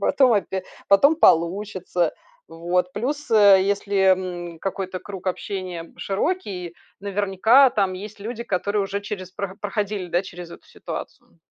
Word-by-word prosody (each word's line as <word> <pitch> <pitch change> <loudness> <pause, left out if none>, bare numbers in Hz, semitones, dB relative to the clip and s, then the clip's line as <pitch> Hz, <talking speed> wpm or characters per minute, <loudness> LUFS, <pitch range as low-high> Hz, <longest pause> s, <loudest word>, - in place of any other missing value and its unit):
потом 255 +4 +4
опя 190 -2 -1 0.3
потом 280 +11 +5
получится. 180 - +2 0.4
Вот. 175 +2 -1
Плюс, 285 +7 -3
а, 205 -3 +8
если, 200 +1 0 0.2
м, 175 -2 -6
какой-то 190 -1 -4
круг 190 0 -9
общения 185 -2 -4
широкий, 195 - -3 0.2
наверняка 205 +6 +4
там 195 -5 0
есть 205 +2 -9
люди, 235 +3 -5
которые 205 +1 -1
уже 200 +1 -3
через 190 -2 -7
про 195 0 -5
проходили, 205 -2 -3
да, 175 +1 0
через 175 -2 -10
эту - - -13
ситуацию. 85 0 -9
195 Hz, 135 wpm, -23 LUFS, 180-205 Hz, 0.4 s, а